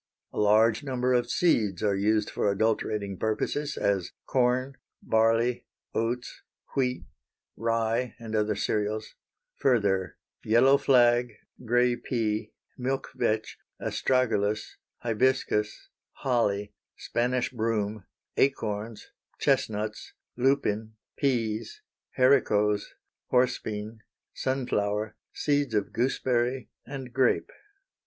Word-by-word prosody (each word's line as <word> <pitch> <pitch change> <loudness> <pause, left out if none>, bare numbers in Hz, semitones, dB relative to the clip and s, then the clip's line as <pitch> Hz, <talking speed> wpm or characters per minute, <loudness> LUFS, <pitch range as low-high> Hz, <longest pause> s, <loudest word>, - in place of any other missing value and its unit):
A - - -3
large 110 +1 +4
number 130 -2 0
of 120 -1 +1
seeds 110 - +2
are 100 -2 +2
used 105 +2 +1
for - - 0
adulterating 100 -1 0
purposes, 125 +7 -1
as 100 -3 0
corn, 130 +1 +1 0.3
barley, 115 +2 +2 0.3
oats, 120 +2 -2 0.3
wheat, 125 -2 0 0.5
rye, 115 +1 0
and 115 -2 -6
other 105 0 +1
cereals; 105 +1 -2 0.4
further, 100 -8 +1 0.3
yellow 130 +5 +5
flag, 120 -2 +4 0.3
gray 120 +1 +3
pea, 110 -3 -2 0.3
milk 130 +2 -2
vetch, 110 0 -1 0.2
astragalus, 110 -5 0 0.3
hibiscus, 115 -2 0 0.2
holly, 105 -6 0 0.2
Spanish 125 +1 -1
broom, 110 -3 -1 0.3
acorns, 110 -5 -1 0.3
chestnuts, 105 0 -1 0.2
lupin, 110 -4 +1 0.2
peas, 115 -5 -1 0.3
haricots, 105 -6 +3 0.4
horse 125 0 +2
bean, 110 +1 -6 0.3
sun 130 0 -1
flower, 105 -1 -1 0.2
seeds 145 -5 0
of 105 - -1
gooseberry 125 0 0 0.2
and 130 -2 -7
grape. 130 - +2
115 Hz, 95 wpm, -28 LUFS, 105-125 Hz, 0.5 s, yellow